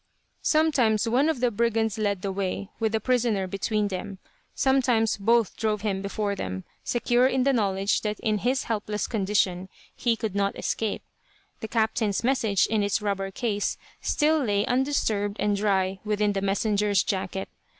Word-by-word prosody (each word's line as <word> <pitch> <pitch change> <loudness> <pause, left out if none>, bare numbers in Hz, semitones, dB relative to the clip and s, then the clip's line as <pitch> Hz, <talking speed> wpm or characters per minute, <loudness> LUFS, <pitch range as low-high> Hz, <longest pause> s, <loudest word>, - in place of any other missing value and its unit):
Sometimes 250 -9 +2
one 260 +7 +3
of 295 -7 -1
the 245 -1 +2
brigands 225 -1 0
led 200 -3 -1
the 195 - -1
way, 195 +1 -3
with 220 -1 +1
the 220 - +2
prisoner 235 -6 +1
between 205 +3 -1
them, 195 +1 -5 0.4
sometimes 250 -5 +2
both 225 +1 +2
drove 215 -2 -1
him 200 -3 -1
before 200 +1 -2
them, 95 - -5 0.2
secure 245 +1 +2
in 260 -1 +1
the 275 +1 +3
knowledge 195 -3 +1
that 210 -1 -3
in 215 -1 0
his 255 +5 0
helpless 210 -2 -2
condition 190 -3 0 0.3
he 235 -2 +1
could 220 -3 -4
not 200 0 0
escape. 220 -2 -2 0.6
The 220 - -5
captain's 220 -2 0
message, 230 -6 +2
in 220 -1 0
its 200 +1 +1
rubber 200 -2 -2
case, 205 0 -2 0.2
still 310 +1 +2
lay 205 -3 +1
undisturbed 235 -6 0
and 205 0 +1
dry 195 -2 0
within 210 -1 +1
the 195 - -1
messenger's 205 0 +1
jacket. 190 0 -3
210 Hz, 160 wpm, -26 LUFS, 200-235 Hz, 0.6 s, one